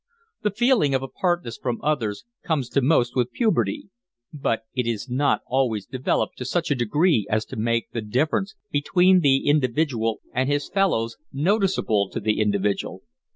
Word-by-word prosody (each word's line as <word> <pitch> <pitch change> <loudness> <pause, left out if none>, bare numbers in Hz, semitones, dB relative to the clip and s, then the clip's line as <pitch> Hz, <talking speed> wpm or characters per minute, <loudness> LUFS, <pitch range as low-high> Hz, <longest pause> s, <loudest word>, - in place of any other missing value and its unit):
The 210 - +1
feeling 210 - +2
of 130 - 0
apartness 175 -1 -2
from 120 -2 -2
others 130 - -1 0.2
comes 140 -7 -1
to 140 - +1
most 125 -3 +2
with 125 -2 0
puberty, 240 +3 0 0.4
but 125 -6 -1
it 125 -2 -1
is 115 +1 -2
not 135 +3 +1
always 120 -6 0
developed 130 0 -2
to 125 - -4
such 165 +3 -1
a - - +3
degree 125 - +2
as 110 +1 0
to - - -9
make 115 +1 -1
the 115 - -3
difference 155 - -1 0.2
between 180 +5 +4
the 135 -4 +3
individual 130 -5 +1
and 130 +2 0
his 145 0 0
fellows 115 - 0
noticeable 150 - +1
to - - -4
the 105 0 0
individual. 100 -1 -1
135 Hz, 160 wpm, -24 LUFS, 115-165 Hz, 0.4 s, between